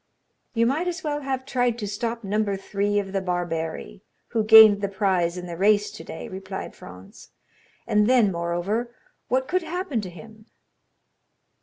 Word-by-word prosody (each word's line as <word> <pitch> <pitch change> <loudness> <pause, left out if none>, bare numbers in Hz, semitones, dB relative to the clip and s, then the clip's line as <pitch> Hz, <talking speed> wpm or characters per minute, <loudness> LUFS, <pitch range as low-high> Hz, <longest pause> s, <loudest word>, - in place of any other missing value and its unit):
"You 230 0 +3
might 300 +9 0
as 355 +1 -4
well 295 -1 -2
have 265 -1 -3
tried 245 -3 0
to 210 -3 -4
stop 230 +3 -3
number 205 0 -1
three 205 +1 -1
of 195 -2 -2
the 195 - 0
barberi, 165 - -4 0.3
who 225 -2 0
gained 215 -2 +8
the 200 - 0
prize 185 -4 0
in 180 - -6
the 170 -1 -6
race 205 +3 +2
today," 205 -5 -8
replied 190 0 -7
Franz; 90 +1 -13 0.6
"and 210 0 +2
then 240 -6 +4
moreover, 175 +8 -2 0.3
what 260 +1 0
could 370 +1 0
happen 330 - -3
to 190 - -7
him?" 215 +5 -14
210 Hz, 160 wpm, -24 LUFS, 190-240 Hz, 0.6 s, gained